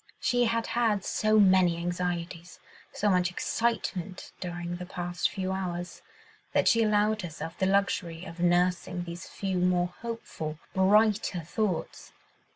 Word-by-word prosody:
She 245 0 +2
had 230 0 0
had 220 -5 +1
so 215 0 +2
many 185 -3 +5
anxieties, 175 0 -3 0.3
so 210 - -1
much 180 -1 +3
excitement 190 -2 -2
during 175 -1 -4
the 180 - -6
past 175 -3 -2
few 190 -1 -3
hours, 175 -2 -4 0.5
that - - +3
she 230 - +5
allowed 215 0 +2
herself 165 -1 -6
the 190 - +2
luxury 190 -3 0
of 165 -1 -9
nursing 180 +1 +1
these 170 +1 -7
few 190 -2 -2
more 180 0 +1
hopeful, 225 -9 -5 0.2
brighter 200 -1 +3
thoughts. 185 +3 -3
180 Hz, 135 wpm, -28 LUFS, 175-205 Hz, 0.5 s, many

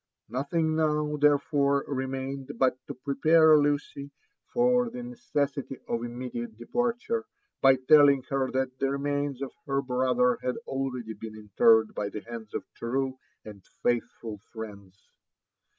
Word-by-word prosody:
Nothing 155 +5 0
now, 150 -1 +1
therefore, 140 -1 +3
remained 135 0 -4
but 130 0 +3
to - - -6
prepare 155 +4 +5
Lucy 145 -1 0 0.4
for 245 0 +3
the 245 +1 -7
ne 245 0 -7
cessity 140 - -2
of 115 0 -2
immediate 120 -2 -6
departure, 240 - -1 0.4
by 135 -1 +7
telling 140 0 +5
her 135 -1 0
that 130 0 -2
the 135 - +1
remains 140 -1 -2
of 135 - -5 0.2
her 135 0 +1
brother 125 -2 +1
had 125 0 -1
already 125 -4 -3
been 110 +1 -9
interred 110 +1 +4
by 100 -1 -2
the 105 - -6
bands 115 -2 -9
of - - -2
true 130 +2 -2 0.3
and 100 -3 -11 0.2
faithful 115 -2 -1
friends. 100 -4 -10
135 Hz, 135 wpm, -28 LUFS, 120-145 Hz, 0.4 s, by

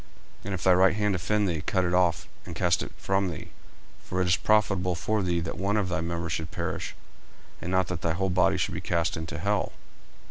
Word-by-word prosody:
40:005:030 - - -23
And 100 - -3
if 90 - -6
thy 95 - +6
right 95 +1 +5
hand 105 -1 +1
offend 105 +3 +1
thee, 80 -4 -1
cut 95 +3 +1
it 90 - 0
off, 90 -2 +2 0.2
and - - -8
cast - - +2
it - - -5
from 95 -1 0
thee: 80 - -7 0.5
for 90 - -3
it 95 - +2
is 90 -1 +4
profitable 95 -3 +2
for 105 +5 0
thee 90 -2 +1
that 80 0 -5
one 100 +2 +1
of 100 -3 0
thy 90 -2 -1
members 85 0 -3
should 80 0 -2
perish, - - -4 0.7
and 90 - -4
not 95 0 +2
that 85 0 -4
thy 85 - +1
whole 95 +2 0
body 90 +1 +3
should - - -1
be - - -4
cast 85 -1 0
into 80 +1 -5
hell. 100 +3 0
90 Hz, 235 wpm, -27 LUFS, 85-95 Hz, 0.7 s, thy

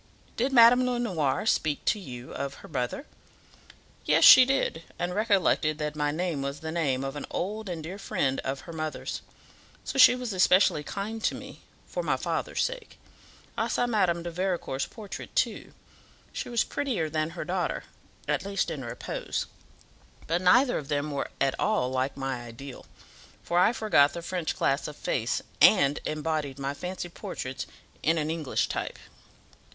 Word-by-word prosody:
Did 255 +4 0
Madame 245 0 +7
Lenoir 200 - 0
speak 155 -8 +1
to 210 - +2
you 125 -8 -9
of 140 0 -4
her - - -10
mother?" 135 - -3 1.0
"Yes, - - +3
she 255 - +11
did, 270 -11 0 0.2
and 175 +1 -2
recollected 195 -7 +2
that 150 -1 -3
my 150 -1 0
name 160 -1 -2
was 140 +1 -4
the 160 0 -4
name 140 -6 0
of 135 +1 -4
an 145 - -6
old 210 +2 -3
and 165 -3 -4
dear 185 +5 -7
friend 135 -8 -1
of 135 0 -3
her 170 - -10
mother's; 155 -1 -4 0.6
so 270 - -3
she 255 - +9
was 250 -4 -4
especially 185 -3 +4
kind 215 +6 -5
to - - +1
me - - -10 0.2
for - - -4
my - - 0
father's - - -1
sake. - - -5 0.6
I - - 0
saw 245 - +1
Madame 185 -8 +1
de 170 - -4
Vericourt's 175 -6 -2
portrait, 205 -4 -9
too. - - 0 0.6
She - - -4
was 235 -1 +2
prettier 235 - -2
than 155 0 -1
her - - -3
daughter, 180 0 -2 0.4
at - - 0
least 195 -3 -1
in 145 -5 -5
repose; 120 - -4 0.8
but 170 +2 0
neither 245 +8 +4
of 145 - -9
them 145 0 -1
were 140 - -3
at 135 -1 +2
all 125 0 +1
like 130 +2 -1
my 135 -2 -3
ideal; 120 +3 -10 0.6
for 175 - +1
I 180 - +5
forgot 205 -12 +3
the 170 - -6
French 175 -2 -2
class 135 +1 0
of 150 - -7
face, 120 -4 -1 0.2
and 145 -8 +6
embodied 155 -3 -2
my 140 0 -3
fancy 180 +4 -5
portraits 130 -6 -6 0.3
in 165 +2 +2
an 155 0 -1
English 160 -4 -1
type." - - -4
165 Hz, 170 wpm, -28 LUFS, 140-200 Hz, 1.0 s, she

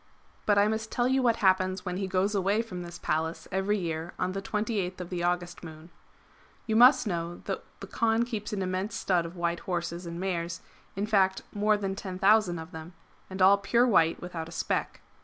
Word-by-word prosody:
^ - - -34 0.4
But 205 -1 +4
I 200 +1 +5
must 220 0 -2
tell 245 -1 +1
you 265 +1 +2
what 235 -3 +3
happens 185 0 +2
when 180 -1 -3
he 195 0 -2
goes 190 +2 +1
away 200 +3 +1
from 185 -6 -7
this 175 0 -8
Palace 160 +1 -2
every 195 +2 +1
year 165 -2 -4
on 180 - -1
the 195 +1 -4
28th 205 -3 -2
of 180 0 -7
the 175 -1 -2
August 175 0 -2
[Moon]. 160 +1 -11 0.7
You 220 - -1
must 250 +3 +7
know 170 -3 -3
that 195 - -3 0.2
the - - -5
Kaan 225 +3 +1
keeps 220 -4 -5
an 200 -2 -2
immense 185 +3 -2
stud 175 -3 +1
of 170 - -11
white 170 -1 -1
horses 175 -1 -4
and 170 0 -6
mares; 170 -3 -3 0.3
in 200 +2 -1
fact 195 -3 +2
more 210 +1 +2
than 195 -2 -2
10,000 195 -1 +2
of 160 +2 -8
them, 160 +2 -9 0.4
and 190 0 0
all 200 +2 +7
pure 235 +5 +3
white 165 -8 +3
without 165 -2 -6
a - - -12
speck. 165 - -2
185 Hz, 210 wpm, -28 LUFS, 175-210 Hz, 0.7 s, must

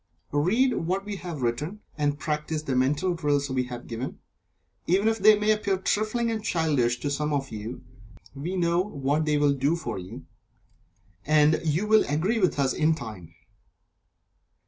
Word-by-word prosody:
Read 210 - +2
what 185 +4 -2
we 205 -1 -4
have 170 -7 -6
written, 150 - -2 0.2
and 145 -1 0
practice 150 0 -3
the 135 -4 -2
Mental 145 +8 +1
Drills 145 -4 0
we 130 -1 0
have 125 -1 -8
given, 120 +3 -5 0.7
even 195 +5 +3
if 225 0 +1
they 210 +1 +7
may 210 +1 +2
appear 205 -2 +1
trifling 215 +4 0
and 220 -2 -3
childish 145 - +1
to 145 - -2
some 150 +1 -1
of 140 -2 -2
you 110 +3 -6 0.5
we 155 +7 -4
know 170 0 +2
what 150 -4 -1
they 150 -1 +2
will 145 -1 +3
do 140 +4 +1
for 120 - -4
you, 90 0 -9 1.0
and 150 +1 +4
you 160 +5 0
will 215 0 +5
agree 180 +11 +1
with 185 -6 +2
us 135 -2 +2
in 155 +1 +2
time. 105 - -9
150 Hz, 170 wpm, -26 LUFS, 140-190 Hz, 1.0 s, they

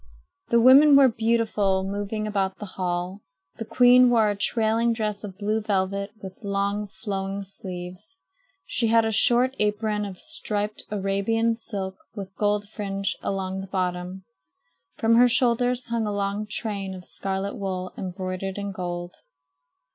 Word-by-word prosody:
The 235 - +4
women 275 +5 +8
were 275 -1 +8
beautiful, 220 -4 +1
moving 205 +2 -3
about 195 -2 -1
the 210 - -7
hall. 180 +2 -3 0.4
The 225 - -5
queen 250 +1 +6
wore 225 -3 +3
a - - -3
trailing 225 +2 +1
dress 215 -2 -3
of 195 -3 -8
blue 215 +2 -1
velvet 200 -1 -1
with 190 -1 -9
long 200 +1 -1
flowing 195 -1 -4
sleeves. 185 - -7 0.5
She 230 - 0
had 225 0 +4
a 220 - 0
short 245 +4 +4
apron 210 0 0
of 195 -2 -7
striped 210 +2 -3
Arabian 210 +3 0
silk 200 -4 -5 0.2
with 195 -2 -7
gold 205 0 0
fringe 200 -2 -3
along 190 -1 -3
the 195 - -8
bottom. 185 0 -3 0.7
From 230 +1 +3
her 245 +1 +6
shoulders 245 +1 +2
hung 230 -2 -1
a - - -1
long 200 +1 -2
train 200 -3 -3
of 180 -1 -11
scarlet 195 +1 -4
wool 185 -2 -4
embroidered 185 +1 -5
in 200 0 -4
gold. 175 -2 -5
205 Hz, 145 wpm, -25 LUFS, 190-225 Hz, 0.7 s, women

